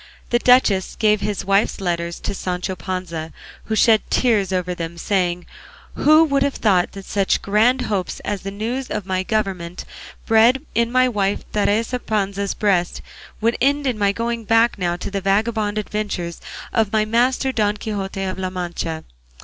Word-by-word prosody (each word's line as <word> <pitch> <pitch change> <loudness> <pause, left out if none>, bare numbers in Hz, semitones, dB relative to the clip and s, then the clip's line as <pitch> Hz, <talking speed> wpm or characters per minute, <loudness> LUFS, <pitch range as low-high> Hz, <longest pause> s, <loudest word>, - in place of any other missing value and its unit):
The 240 - +3
duchess 245 -7 +3
gave 210 -1 +2
his 205 -1 -2
wife's 195 +3 +2
letters 170 -2 -2
to - - -3
Sancho 185 0 -3
Panza, 170 -3 -5 0.3
who 220 - -1
shed 220 0 +5
tears 210 -7 +2
over 180 -1 -1
them, 170 -1 -6
saying, 180 -1 -1 0.5
"Who 310 +2 +5
would 280 -3 +1
have 280 0 +1
thought 185 -5 +2
that 195 -1 -9
such 195 -2 0
grand 225 +6 +3
hopes 200 -7 -2
as 205 -2 -3
the 195 - -5
news 230 +6 -3
of 200 - -3
my 185 -1 -1
government 185 -4 -3 0.4
bred 235 +5 +4
in 235 0 +1
my 255 0 +4
wife 205 -4 -1
Teresa 220 +4 0
Panza's 200 -3 -2
breast 185 -4 0 0.4
would 230 +2 +2
end 285 +2 +2
in 245 -5 -1
my 200 -1 +3
going 230 +2 -3
back 225 0 +3
now 175 -2 0
to 180 - -6
the 195 -1 -2
vagabond 210 +2 0
adventures 205 -5 -3 0.3
of 220 -3 +1
my 215 -1 +2
master 250 +4 +1
Don 210 -3 0
Quixote 195 -3 -4
of 190 0 -3
La 185 -1 -2
Mancha? 175 -3 -4
205 Hz, 170 wpm, -21 LUFS, 185-230 Hz, 0.5 s, shed